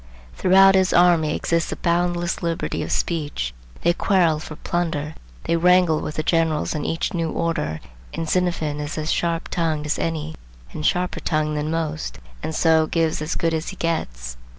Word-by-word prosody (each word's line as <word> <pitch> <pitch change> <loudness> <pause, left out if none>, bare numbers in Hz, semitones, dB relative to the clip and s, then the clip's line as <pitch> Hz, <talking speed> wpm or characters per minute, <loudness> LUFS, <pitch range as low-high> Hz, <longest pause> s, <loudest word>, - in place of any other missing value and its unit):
Throughout 195 - +6
his 190 -1 +3
army 170 -3 +4
exists 170 0 0
a - - -2
boundless 175 +1 0
liberty 170 -1 -2
of - - -4
speech. 145 - -2 0.3
They 170 - +4
quarrel 170 -5 +2
for 155 0 -8
plunder, 160 -3 -2 0.3
they 170 - +1
wrangle 180 -1 +4
with 150 - -5
the 155 - -1
generals 160 -2 +1
on 150 -2 -3
each 165 - -2
new 165 -2 -1
order, 120 - -2 0.3
and 165 - -4
Xenophon 165 -4 0
is 150 +2 -4
as 155 +1 -1
sharp 170 -1 -1
tongued 160 -3 -1
as 150 - -1
any 160 -1 -2 0.4
and 75 - -6
sharper 180 - 0
tongued 155 -1 -1
than 150 +1 -2
most, 160 -1 -3 0.2
and 160 0 -4
so 160 -1 +4
gives 160 -2 0
as 155 +2 -2
good 165 -1 0
as 160 +1 -2
he 195 - -7
gets. 60 - -3
165 Hz, 175 wpm, -22 LUFS, 155-175 Hz, 0.4 s, Throughout